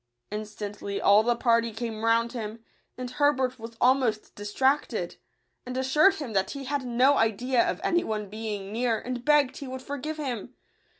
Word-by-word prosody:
Instantly 210 -1 -5
all 205 +1 +6
the 240 +2 +1
party 230 -1 +2
came 220 0 -5
round 230 +1 +3
him; 225 -1 -6 0.3
and 250 0 -4
Herbert 260 -2 +1
was 230 0 -9
almost 250 -4 +2
distracted, 260 +8 0 0.5
and 250 0 -5
assured 300 +9 +4
him 280 - -6
that 190 -1 +1
he 280 -1 -6
had 280 +1 -2
no 255 +3 +3
idea 235 +3 +2
of - - -2
any 345 0 +2
one 215 -1 -3
being 210 -1 -5
near, 230 0 +1
and 245 +1 -5
begged 290 -2 +3
he 280 - -7
would 260 0 -6
forgive 285 +3 -4
him. 250 -4 -4
240 Hz, 170 wpm, -27 LUFS, 220-265 Hz, 0.5 s, all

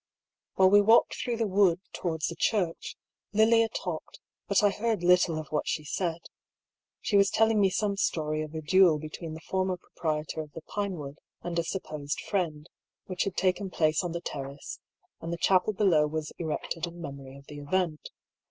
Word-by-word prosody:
While 190 0 +5
we 205 0 +7
walked 225 +3 +5
through 240 -2 -3
the 225 - +1
wood 190 -3 +3
towards 160 -3 -2
the 170 - -3
church, 175 -1 -1 0.4
Lilia 225 +1 +4
talked, 175 -6 -5 0.3
but 200 0 +3
I 205 - +5
heard 220 -3 -1
little 180 -2 +4
of 155 -2 -6
what 150 - -1
she 155 - -1
said. 170 +2 -2 0.8
She 205 - -1
was 200 0 +5
telling 225 -1 +3
me 195 - +5
some 200 +1 -1
story 155 -5 0
of 155 0 -6
a 160 - -3
duel 180 0 +5
between 155 +1 -7
the 160 - -10
former 185 -1 0
proprietor 155 -2 -3
of 150 -2 -11
the 165 - -9
Pinewood 170 -9 -4 0.2
and 170 -1 -2
a - - +1
supposed 155 -5 -4
friend, 165 -6 -2 0.4
which 185 0 -2
had 195 - -3
taken 190 +1 +1
place 155 -1 +1
on 175 - -3
the 170 0 -4
terrace, 140 -3 -6 0.4
and 165 - -5
the 170 - -2
chapel 185 +3 +3
below 185 -7 +3
was 155 0 -4
erected 165 +1 -3
in 170 0 -10
memory 140 -4 -8
of 140 - -15
the 145 +1 -9
event. 160 +1 -1
170 Hz, 185 wpm, -28 LUFS, 155-195 Hz, 0.8 s, we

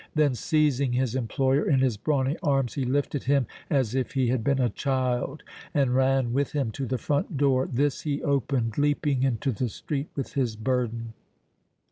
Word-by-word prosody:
Then, 150 -3 +3
seizing 140 -1 +1
his 125 -2 0
employer 130 +3 +1
in 140 - +4
his 130 -4 +2
brawny 135 +5 0
arms, 135 -5 +1
he 135 - -2
lifted 140 +2 -1
him 135 -1 +3 0.2
as 130 -6 +1
if 130 -1 -1
he 130 -3 +1
had 125 -2 0
been 140 +3 +2
a 125 - +3
child 130 +1 -1 0.3
and 135 -4 +2
ran 130 -2 +2
with 140 +1 0
him 135 -6 0
to 135 +4 -4
the 130 - -1
front 145 +2 -1
door; 135 -2 +2
this 140 +2 0
he 145 -2 -2
opened, 135 -5 0
leaping 145 -2 +1
into 130 0 +1
the 120 +2 -2
street 140 +6 -4
with 135 - -4
his 125 -5 0
burden. 115 -1 -2
135 Hz, 180 wpm, -26 LUFS, 125-140 Hz, 0.3 s, in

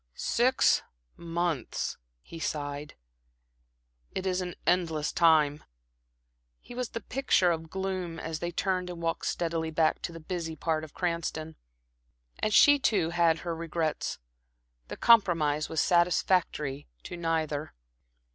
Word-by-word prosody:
"Six 255 +3 +3 0.3
months," 170 -5 -2 0.2
he 165 - -10
sighed. 145 -1 -4 1.2
"It 190 - -3
is 185 0 0
an 180 -2 -5
endless 165 -3 +1
time." 155 -3 +4 1.0
He - - -12
was 245 -1 -3
the 230 - -5
picture 230 -9 +2
of 160 -1 -4
gloom 185 -3 -3
as 160 -1 -4
they 175 - -2
turned 185 0 -1
and 175 -1 -7
walked 165 0 -2
steadily 165 -1 -1
back 160 0 +1
to - - -4
the 165 - -9
busy 165 -1 -4
part 160 -1 -1
of 155 - -11
Cranston. 165 -2 -3 0.8
And 215 - 0
she, 290 +6 +7
too, 190 -10 +1
had 170 -2 +2
her 170 -1 -2
regrets. 165 -1 -2 0.7
The - - -7
compromise 165 -10 +4
was 160 - +1
satisfactory 175 -5 +1 0.2
to 175 - -7
neither. 160 -3 -2
165 Hz, 130 wpm, -29 LUFS, 160-180 Hz, 1.2 s, she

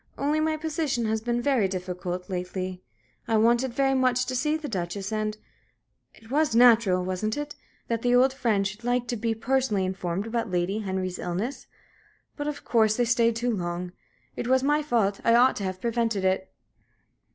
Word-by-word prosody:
Only 295 +2 +1
my 310 0 +1
position 305 -6 -1
has 220 0 0
been 240 +1 -1
very 255 -8 +2
difficult 180 -1 -4
lately. 185 0 -4 0.5
I 225 -1 +2
wanted 235 +3 +3
very 270 +2 +1
much 255 -1 +2
to 255 - -3
see 300 +5 +1
the 315 -2 -6
Duchess 195 -1 -4
and 215 0 -2 0.8
it 225 +2 -17
was 295 -4 +2
natural 225 -7 +5
wasn't 185 +5 -2
it? 295 0 -5 0.3
that 230 -1 -1
the 245 0 +3
old 260 +2 +4
friends 210 -7 +1
should 210 +4 -11
like 245 0 0
to 240 - 0
be 225 0 -1
personally 230 -4 0
informed 185 +1 -3
about 225 -1 -2
Lady 180 +3 0
Henry's 190 -3 -3
illness? 195 +10 -4 0.7
But, 290 -1 -4
of 295 -1 -4
course, 220 -2 +3
they 245 - +2
stayed 235 -1 +2
too 235 0 0
long; 175 -1 -4 0.4
it - - -4
was 260 +1 +3
my 295 +2 +2
fault 225 -9 0
I 230 - +4
ought 250 +2 +5
to 200 - -4
have 185 0 -4
prevented 225 -3 0
it." 190 0 0
230 Hz, 185 wpm, -26 LUFS, 190-255 Hz, 0.8 s, natural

